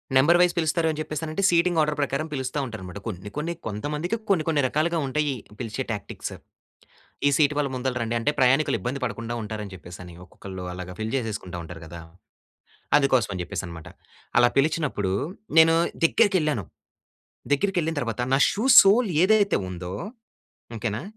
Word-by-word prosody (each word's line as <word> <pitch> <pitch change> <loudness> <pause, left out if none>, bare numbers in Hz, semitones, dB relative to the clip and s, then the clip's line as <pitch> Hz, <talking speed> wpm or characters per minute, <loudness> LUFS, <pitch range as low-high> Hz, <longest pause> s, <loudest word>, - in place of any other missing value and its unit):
Number 155 +7 +6
wise 180 -1 +4
పిలుస్తారు 160 0 +1
అని 155 - -6
చెప్పేసనంటే, 155 +3 -4
సీటింగ్ 170 0 +2
ఆర్డర్ 150 0 +1
ప్రకారం 140 +2 -1
పిలుస్తా 130 0 -3
ఉంటారన్నమాట. 100 -5 -8
కొన్ని, 105 -3 -6
కొన్ని 165 +3 -2
కొంతమందికి 150 - -3
కొన్ని, 185 -6 +3
కొన్ని 155 -3 +2
రకాలుగా 160 +5 0
ఉంటాయి, 145 +1 0 0.3
పిలిచే 115 +1 -3
టాక్టిక్స్. 105 -2 -5 0.9
ఈ - - +7
సీట్ 150 -1 +3
వాళ్ళు 145 -2 0
ముందల 130 0 -2
రండి 115 0 -2
అంటే, 115 +5 +1
ప్రయాణికులు 135 +3 +3
ఇబ్బంది 125 +8 -3
పడకుండా 115 0 -4
ఉంటారని 105 -2 -6
చెప్పేసి, 90 -1 -11
ఒక్కొక్కళ్ళు 95 +1 -9
అలాగా 90 0 -7
ఫిల్ 110 +1 -3
చేసేసుకుంటా 105 -7 -4
ఉంటారు 80 0 -10
కదా! 85 +1 -9 1.0
అందుకోసం 130 -6 +2
అని 90 - -4
చెప్పేసి 85 - -4
అన్నమాట. 85 -2 -9 0.5
అలా 120 0 +6
పిలిచినప్పుడు 140 - +1 0.5
నేను 165 0 +7 0.3
దగ్గరికెళ్ళాను. 165 - +2 0.9
దగ్గరికెళ్ళిన 165 -1 -1
తర్వాత 115 -1 -3
నా - - +4
షూ 215 - -2 0.2
సోల్ 205 +2 +4
ఏదైతే 205 0 +3
ఉందో, 90 0 -6 0.8
ఓకే 115 +1 -2
నా, 115 - -5
135 Hz, 150 wpm, -25 LUFS, 105-160 Hz, 1.0 s, ఈ